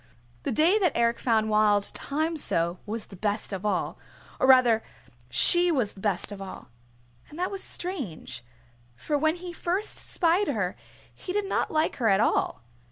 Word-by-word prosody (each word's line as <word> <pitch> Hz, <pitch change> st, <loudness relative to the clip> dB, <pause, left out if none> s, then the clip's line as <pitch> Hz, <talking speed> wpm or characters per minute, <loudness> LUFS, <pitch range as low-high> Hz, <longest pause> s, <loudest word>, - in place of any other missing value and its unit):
The -, -, -3 dB
day 340 Hz, -, +3 dB
that 360 Hz, -6 st, +2 dB
Eric 235 Hz, 0 st, +1 dB
found 220 Hz, -3 st, +1 dB
Wild 210 Hz, -1 st, +3 dB
Thyme 315 Hz, +4 st, -3 dB
so 170 Hz, -, +1 dB
was 220 Hz, +1 st, -4 dB
the 195 Hz, -, -13 dB
best 205 Hz, +2 st, -2 dB
of 190 Hz, 0 st, -5 dB
all, 200 Hz, -4 st, -2 dB, 0.4 s
or 260 Hz, -, +2 dB
rather 250 Hz, -4 st, +6 dB, 0.5 s
she 345 Hz, -, +4 dB
was 250 Hz, -10 st, 0 dB
the -, -, -15 dB
best 200 Hz, -1 st, 0 dB
of 200 Hz, -1 st, -8 dB
all. 195 Hz, -, -9 dB, 0.6 s
And 300 Hz, -, -12 dB
that 360 Hz, +1 st, -2 dB
was 390 Hz, -1 st, -2 dB
strange, 275 Hz, -, -2 dB, 0.5 s
for 295 Hz, -, -3 dB
when 315 Hz, +3 st, +1 dB
he 355 Hz, 0 st, -8 dB
first 365 Hz, +5 st, -1 dB
spied 355 Hz, +3 st, +1 dB
her 205 Hz, -9 st, -1 dB, 0.4 s
he 365 Hz, -, -7 dB
did 415 Hz, 0 st, 0 dB
not 390 Hz, -, -1 dB
like 310 Hz, 0 st, 0 dB
her 235 Hz, -, 0 dB
at 195 Hz, 0 st, +3 dB
all. 220 Hz, -, 0 dB
240 Hz, 175 wpm, -26 LUFS, 205-340 Hz, 0.6 s, rather